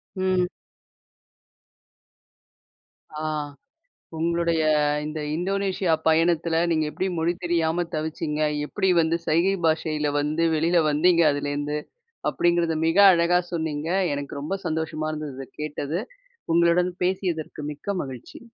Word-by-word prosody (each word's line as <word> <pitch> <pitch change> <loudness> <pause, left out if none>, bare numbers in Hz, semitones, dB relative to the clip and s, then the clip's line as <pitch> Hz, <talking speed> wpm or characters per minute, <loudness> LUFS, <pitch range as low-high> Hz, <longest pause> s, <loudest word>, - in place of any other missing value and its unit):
ம். 185 -1 +1 2.7
ஆ. - - -4 0.9
உங்களுடைய 170 0 +1 0.4
இந்த 155 0 -4 0.2
இந்தோனேஷியா 190 0 -1 0.2
பயணத்தில 165 0 +2
நீங்க 155 -1 +1
எப்பிடி 190 - -2
மொழி 165 +2 +1
தெரியாம 170 0 +1
தவிச்சிங்க? 155 0 -3 0.2
எப்பிடி 190 +4 -1
வந்து 165 +1 +1
சைகை 170 +5 +3
பாஷையில 155 -2 0
வந்து 155 +3 0
வெளில 170 +2 +3
வந்தீங்க? 170 +3 +4
அதுலேருந்து, 145 +1 -2 0.5
அப்பிடிங்கிறத 170 -2 +1
மிக 165 +4 +2
அழகா 170 +1 +3
சொன்னீங்க. 160 -1 -2 0.3
எனக்கு 140 0 -5
ரொம்ப 185 +7 -2
சந்தோஷமா 155 -1 -2
இருந்தது. 150 -3 -5
இத 135 - -6
கேட்டது. 150 +2 -3 0.5
உங்களுடன் 170 +2 +3
பேசியதற்கு 180 -5 -2
மிக்க 200 +8 -4
மகிழ்ச்சி. 130 -3 -9
165 Hz, 105 wpm, -24 LUFS, 155-175 Hz, 2.7 s, வந்தீங்க